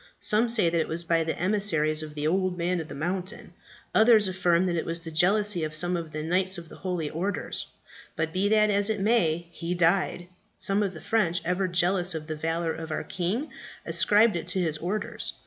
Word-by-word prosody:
Some 220 +3 +3
say 225 -6 +3
that 165 0 +1
it - - -3
was 165 +2 -1
by 165 -1 +1
emissaries 160 -3 +1
of 155 -1 -8
the 150 0 -3
Old 185 +2 0
Man 175 +1 -1
of 160 - -6
the - - -9
Mountain. 185 +7 -4 0.4
Others 220 -2 +5
affirm 180 -1 +1
that 175 -2 0
it 165 - -1
was 165 0 -2
the 165 -1 -8
jealousy 190 +2 +2
of 155 0 -3
some 175 +3 +2
of 165 -2 -5
the 155 0 -5
knights 185 +3 0
of 170 -1 -10
the - - -12
holy 180 -4 -3
orders. 185 +6 -3 0.5
But 160 0 -2
be 195 +2 +1
that 215 -1 +4
as 200 +1 +2
it 215 -2 -1
may, 175 -6 +1
he 170 +1 -4
died. 175 +1 +1 0.3
Some 195 +1 0
of 195 -3 -2
the 160 - -9
French, 185 -6 +1
ever 180 +2 0
jealous 180 0 +1
of 155 -1 -5
the 155 0 -5
valour 165 +1 -2
of 160 0 -7
our 155 - -3
king, 195 - -3 0.3
ascribed 210 0 +4
it 170 - -4
to 185 +1 0
his 160 -4 -1
orders. 205 +6 -3
175 Hz, 215 wpm, -26 LUFS, 165-195 Hz, 0.5 s, Others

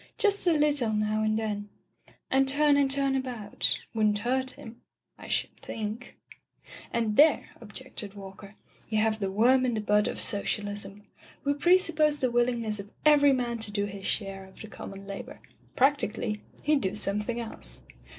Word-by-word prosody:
Just 405 -3 +2
a 345 - +5
little 290 -7 +2
now 215 0 0
and 215 0 +1
then, 210 -2 -3 0.6
and 270 0 +3
turn 290 +1 +4
and 280 -1 +3
turn 275 0 +1
about, 245 -6 -1
wouldn't 215 -2 +2
hurt 260 +4 0
him 230 -3 -4 0.2
— - - -54
I - - -10
should - - -1
think 220 +2 -6 0.4
" - - -16
"And 225 -3 -1
there," 305 +3 +5
objected 205 -2 -8
Walker, 195 +1 -11 0.3
"you 215 - 0
have 220 0 +1
the 195 -2 -1
worm 245 +6 +4
in 245 -2 0
the - - -1
bud 210 0 +2
of - - -4
socialism. 205 0 -2 0.4
We 285 - +1
pre 345 +6 +5
suppose 305 -5 +1
the 255 -2 +1
willingness 235 -3 0
of 200 0 -8 0.2
every 290 -2 +6
man 240 -3 -1
to 220 - 0
do 205 0 -1
his 200 -1 -6
share 195 -2 -2
of 190 - -17
the 220 - -8
common 195 -2 -9
labor. 245 +8 -8 0.4
Practically, 240 -6 +1 0.2
heM 300 -1 +3
do 190 -2 -2
something 210 +3 -1
else." 60 - -9
225 Hz, 175 wpm, -28 LUFS, 205-270 Hz, 0.6 s, every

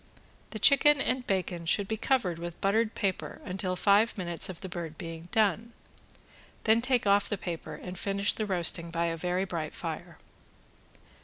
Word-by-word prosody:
The - - -6
chicken 295 0 +6
and 255 -1 -1
bacon 180 -3 -2
should 200 +4 +2
be 220 - -1
covered 210 -8 0
with 170 0 -7
buttered 215 +3 +1
paper, 195 -3 -2
until 185 -1 -2
five 205 +5 +3
minutes 175 -2 -2
of 180 - -8
the 190 - -5
bird 170 -3 -6
being 165 0 -8
done, 220 +1 +1 0.9
then 225 +1 +4
take 255 -2 +1
off 200 0 +3
the 205 - -1
paper, 165 -4 -6
and 180 +3 -8
finish 200 +1 0
the 215 - -3
roasting 170 -2 +2
by 170 0 -1
a 165 -1 -1
very 180 +3 -1
bright 165 -5 -4
fire. - - -6
190 Hz, 170 wpm, -29 LUFS, 170-215 Hz, 0.9 s, chicken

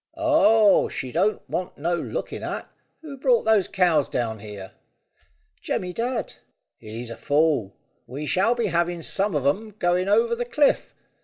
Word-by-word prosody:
"Oh, 225 -10 +4
she 130 - -5
don't 190 +8 0
want 180 - -4
no 170 +4 -1
looking - - -5
at. - - -5 0.4
Who 285 -3 -8
brought 480 - +3
those 220 -4 +3
cows 175 -7 +2
down 110 -3 -2
here?" 100 -2 -9 0.9
"Jemmy 180 -1 -3
Dadd." 235 +3 -3 0.5
"He's 115 +2 -7
a - - -6
fool. 145 -9 +1 0.3
We 140 +4 -6
shall 195 +10 +2
be 235 -2 -1
having 170 -2 -1
some 195 0 0
of 140 -2 -1
'em 205 +9 -1
going 180 -1 +1
over 230 +3 +3
the 240 +1 -1
cliff. 285 +4 +1
180 Hz, 155 wpm, -24 LUFS, 145-225 Hz, 0.9 s, Oh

